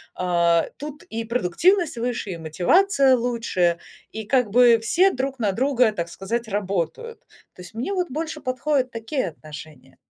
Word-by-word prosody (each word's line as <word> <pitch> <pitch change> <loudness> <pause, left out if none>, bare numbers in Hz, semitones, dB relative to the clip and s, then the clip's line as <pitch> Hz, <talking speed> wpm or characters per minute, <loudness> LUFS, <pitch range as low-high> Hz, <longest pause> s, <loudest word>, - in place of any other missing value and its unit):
а, 170 -2 +2
тут 295 +3 -8
и 230 -10 -5
продуктивность 250 - +1
выше, 235 -4 -3
и 170 - -5
мотивация 265 - +3
лучше, 230 -8 0 0.3
и 220 0 -6
как 250 -1 +2
бы 235 +1 +5
все 370 +11 +3
друг 265 +1 -3
на 210 -4 +1
друга, 250 0 +2
так 170 -4 -4
сказать, 230 +7 -4
работают. 205 - -3 0.3
То 180 - -13
есть 180 - -12
мне 245 - -3
вот 360 -2 -1
больше 310 +2 -5
подходят 255 0 -1
такие 230 +1 -3
отношения. 150 -4 -13
235 Hz, 155 wpm, -23 LUFS, 185-275 Hz, 0.3 s, бы